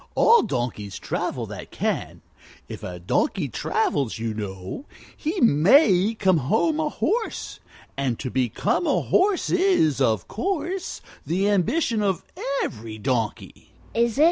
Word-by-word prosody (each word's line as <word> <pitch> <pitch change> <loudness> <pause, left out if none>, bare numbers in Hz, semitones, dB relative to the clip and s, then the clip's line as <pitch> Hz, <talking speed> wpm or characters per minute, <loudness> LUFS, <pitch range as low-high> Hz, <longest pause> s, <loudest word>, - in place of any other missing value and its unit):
All 465 +1 +6
donkeys 120 - -3
travel - - -3
that - - -8
can. - - -3 0.4
If - - -8
a 90 -1 -6
donkey 85 - 0
travels, 135 -6 -1
you 115 0 -3
know, 95 - -6 0.3
he 330 +5 -3
may 205 - +5
come 190 -4 +3
home 225 - +1
a 310 -1 +1
horse; 440 +9 -2 0.4
and 135 -4 -1
to 130 - -5
become 130 - 0
a - - +2
horse 380 0 +2
is, 355 - +3
of 110 -6 +1
course, 360 - -3 0.2
the 190 +4 0
ambition 215 - +1
of 190 -4 0 0.4
every 110 -1 -6
donkey!" 115 -1 -3
180 Hz, 125 wpm, -24 LUFS, -, 0.4 s, All